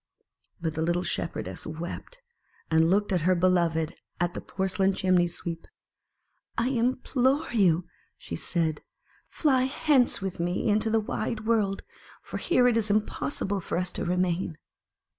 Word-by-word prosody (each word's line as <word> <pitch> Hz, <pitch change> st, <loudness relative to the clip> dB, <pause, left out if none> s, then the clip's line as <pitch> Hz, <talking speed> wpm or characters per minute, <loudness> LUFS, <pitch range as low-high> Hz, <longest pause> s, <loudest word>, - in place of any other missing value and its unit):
But 165 Hz, -2 st, -2 dB
the 160 Hz, -, -3 dB
little 175 Hz, +2 st, +1 dB
Shepherdess 165 Hz, -, -3 dB
wept, 170 Hz, -, -7 dB, 0.5 s
and 160 Hz, +1 st, +4 dB
looked 205 Hz, +2 st, +2 dB
at 180 Hz, -3 st, +2 dB
her 185 Hz, +3 st, +3 dB
beloved 170 Hz, -2 st, +2 dB, 0.2 s
at 175 Hz, 0 st, 0 dB
the -, -, -5 dB
porcelain 190 Hz, 0 st, 0 dB
Chimney 185 Hz, -2 st, +3 dB
sweep. 170 Hz, -1 st, -5 dB, 0.9 s
"I 235 Hz, +2 st, +1 dB
implore 255 Hz, +2 st, +1 dB
you," 180 Hz, -6 st, +3 dB, 0.3 s
said 160 Hz, -, -2 dB
she, -, -, -33 dB, 0.5 s
"fly 265 Hz, -5 st, +2 dB
hence 270 Hz, -1 st, +3 dB
with 190 Hz, -3 st, -4 dB
me 175 Hz, +6 st, -1 dB
into 215 Hz, +2 st, +3 dB
the 225 Hz, 0 st, +3 dB
wide 215 Hz, +1 st, -3 dB
world: 210 Hz, -4 st, +1 dB, 0.4 s
for -, -, -7 dB
here 250 Hz, -8 st, +3 dB
it 240 Hz, -2 st, +3 dB
is 220 Hz, -2 st, +1 dB
impossible 200 Hz, -2 st, 0 dB
for 170 Hz, -, -3 dB
us 180 Hz, 0 st, -1 dB
to -, -, -3 dB
remain." 180 Hz, -2 st, 0 dB
185 Hz, 145 wpm, -27 LUFS, 170-225 Hz, 0.9 s, and